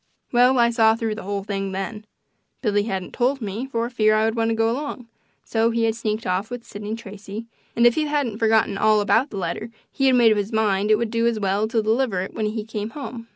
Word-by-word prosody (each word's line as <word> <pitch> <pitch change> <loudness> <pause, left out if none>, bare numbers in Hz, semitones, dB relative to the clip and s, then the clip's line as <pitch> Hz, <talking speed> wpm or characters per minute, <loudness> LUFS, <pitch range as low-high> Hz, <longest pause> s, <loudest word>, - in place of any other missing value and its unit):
Well, 250 +2 +4
I 235 -1 +4
saw 225 -1 +4
through 225 -1 -2
the 220 - -7
whole 200 0 -3
thing 195 -1 -3
then. 210 +3 -5 0.6
Billy 205 -3 +2
hadn't 190 -4 -4
told 260 +3 +1
me, 220 +3 -4
for 235 -3 -2
fear 215 -3 +2
I 215 0 +3
would 225 - +1
want 225 -1 +1
to 225 - +1
go 225 0 +2
along; 260 -2 -5 0.4
so 225 0 +1
he 230 0 0
had 225 -1 +2
sneaked 220 -1 -3
off 185 +3 -1
with 245 -1 -6
Sidney 210 +1 -6
Tracy, 210 0 -8 0.3
and 235 - +4
if 240 - +6
he 305 +2 0
hadn't 280 -8 -1
forgotten 220 -3 +2
all 215 0 +4
about 225 +6 +2
the 200 - -7
letter 190 +5 -3 0.2
he 270 - +1
had 260 - +5
made 235 -2 +6
up 215 - +2
his 205 +1 -3
mind 210 -2 +1
it 215 - +6
would 220 0 -2
do 230 0 +1
as 230 -2 0
well 200 +2 0
to 225 -1 0
deliver 220 -3 +1
it 190 - -6
when 215 - -1
he 215 0 -3
came 215 -1 -5
home. 240 -3 -8
220 Hz, 245 wpm, -23 LUFS, 210-235 Hz, 0.6 s, if